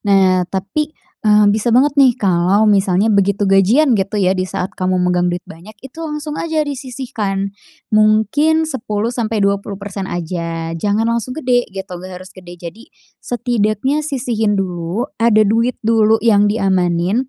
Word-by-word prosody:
nah, 190 -3 +2
tapi, 290 +11 -3 0.2
eee, 210 -1 +4
bisa 220 +2 -1
banget 260 +5 +4
nih 255 -3 +5
kalau 190 +2 +2
misalnya 200 0 +2
begitu 200 0 +1
gajian 205 +9 +3
gitu 200 0 -1
ya, 185 -2 +2
di 185 -1 -2
saat 180 - -4
kamu 185 0 -1
megang 180 0 +1
duit 175 +1 -4
banyak, 185 +7 -13
itu 270 +5 -10
langsung 300 -1 -5
aja 315 -2 -1
disisihkan, 240 -8 -4 0.4
mungkin 220 +10 +3
10 235 -6 -3
sampai 225 -3 -1
20 200 0 -1
persen 195 -1 -6
aja, 165 -1 -4
jangan 205 +6 0
langsung 235 +3 -2
gede 250 -5 0
gitu, 190 -1 -8
nggak 185 0 -9
harus 185 +1 -12
gede. 175 -2 -12
Jadi 175 +7 -10 0.3
setidaknya 240 +3 -1
sisihin 240 -8 -1
dulu, 180 +3 -3 0.2
ada 220 -2 +4
duit 230 +4 +1
dulu 225 -1 +3
yang 205 -2 +4
diamanin, 190 +3 0
210 Hz, 155 wpm, -17 LUFS, 185-240 Hz, 0.4 s, nih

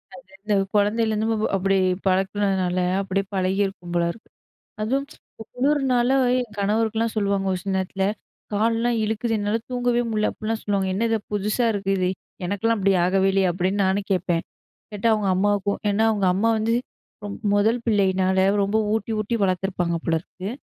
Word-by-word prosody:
அது 180 - -13
வந்து 205 +2 -2 0.2
குழந்தையிலருந்து 215 +1 +2
வ - - +2
வ - - +1
அப்படி 195 0 +1 0.3
பழக்குனதுனால, 190 -1 +1 0.2
அப்படி 195 0 -1
பழகியிருக்கும் 190 -1 -1
போல 175 0 +2
இருக்கு. 220 - -16 0.5
அதுவும், 265 +6 0 0.5
குளுர்னால 265 -1 +2 0.2
என் 245 -2 -4
கணவருக்குலாம் 220 +2 0
சொல்லுவாங்க 200 -2 0
ஒரு 185 - -1
சில 195 -1 -2
நேரத்துல, 190 +1 -1 0.5
"கால்லாம் 230 +3 +1
இழுக்குது, 220 +2 -1
என்னால 205 +2 0
தூங்கவே 245 -1 +1
முட்ல." 215 -1 +1
அப்புட்லாம் 220 +1 -4
சொல்லுவாங்க. 195 -2 0
"என்ன 225 +5 0
இது 225 -1 +1
புதுசா 210 +4 +1
இருக்கு? 195 -1 -2
இது 180 -1 +1 0.4
எனக்குலாம் 225 +4 0
அப்படி 195 0 +3
ஆகவே 190 +1 +2
இல்லையே?" 190 -1 +3
அப்படி 180 +2 -1
நானும் 195 +1 0
கேட்பேன். 175 -2 0 0.5
கேட்டா 210 +2 -1
அவுங்க 210 -3 0
அம்மாவுக்கும் 200 +1 +1
ஏன்னா, 210 +2 +1
அவுங்க 200 -3 +1
அம்மா 225 +4 +2
வந்து 225 +2 +1 0.5
ரொம் 205 - -6 0.2
முதல் 225 +4 +2
பிள்ளையினால 190 -3 +2 0.2
ரொம்ப 200 +2 0 0.2
ஊட்டி 220 +1 -2
ஊட்டி 215 +3 -1
வளர்த்துருப்பாங்க 185 -2 0
போலருக்கு. 165 +4 -3
205 Hz, 155 wpm, -23 LUFS, 190-225 Hz, 0.5 s, அப்படி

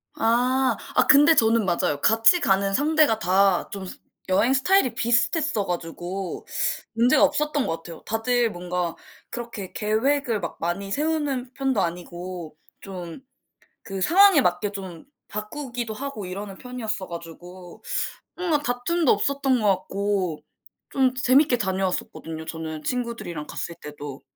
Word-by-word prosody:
아. 250 +2 +2 0.2
아 - - +4
근데 295 +3 +7
저는 225 -3 +3
맞아요. 170 -5 0
같이 225 +10 +5
가는 195 - +2
상대가 295 -2 +3
다 190 -1 +3
좀 195 -1 -6 0.4
여행 230 +7 +3
스타일이 270 - +3
비슷했어 240 - +1
가지고 175 +2 -5 0.5
문제가 235 +3 +4
없었던 300 -2 +1
것 165 - -2
같아요. 165 0 -11
다들 235 +1 +1
뭔가 175 -1 -3 0.4
그렇게 235 -6 -6
계획을 230 +2 +1
막 170 - -5
많이 195 +4 -2
세우는 285 -3 -1
편도 265 -6 0
아니고 175 -1 -5 0.3
좀 180 -2 -8 0.7
그 195 -1 -5
상황에 370 - +6
맞게 180 -2 +1
좀 190 -5 -8 0.2
바꾸기도 240 +1 -5
하고 260 -3 -6
이러는 195 +1 -6
편이었어가지고 185 -7 -7 0.5
뭔가 345 -4 +1
다툼도 275 +5 +1
없었던 270 +4 +1
것 215 - +1
같고 190 -3 -2 0.5
좀 260 -1 +2
재 255 - -3
재밌게 275 -1 +5
다녀왔었거든요 185 -5 -3
저는 160 -1 -6
친구들이랑 235 -11 -3
갔을 170 - -5
때도. 145 -2 -8
215 Hz, 295 characters per minute, -24 LUFS, 180-260 Hz, 0.7 s, 근데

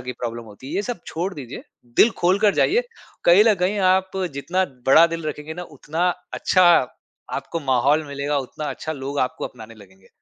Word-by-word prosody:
की 125 0 -5
प्रॉब्लम 120 -1 -6
होती 110 +4 -13
है, - - -6
ये 200 - 0
सब 240 -3 -5
छोड़ 180 +4 -3
दीजिए 135 -3 -8 0.3
दिल 235 - +6
खोल 180 +3 +3
कर 205 -1 +3
जाइए। 465 +6 +3 0.4
कहीं 175 +4 +7
ल 225 -2 +5
कहीं 200 +3 +1
आप 190 +1 +1 0.2
जितना 180 +7 0 0.2
बड़ा 160 +5 +7
दिल 165 -1 -5
रखेंगे 150 +1 -6
ना 180 - -6
उतना 165 +4 -1 0.3
अच्छा 185 -1 +3 0.7
आपको 165 - -4
माहौल 140 +3 +2
मिलेगा, 140 +1 -2
उतना 140 +3 -6
अच्छा 155 - -5
लोग 140 -1 -5
आपको 130 - -1
अपनाने 115 -2 -12
लगेंगे। 95 -3 -19
155 Hz, 190 wpm, -22 LUFS, 130-185 Hz, 0.7 s, कहीं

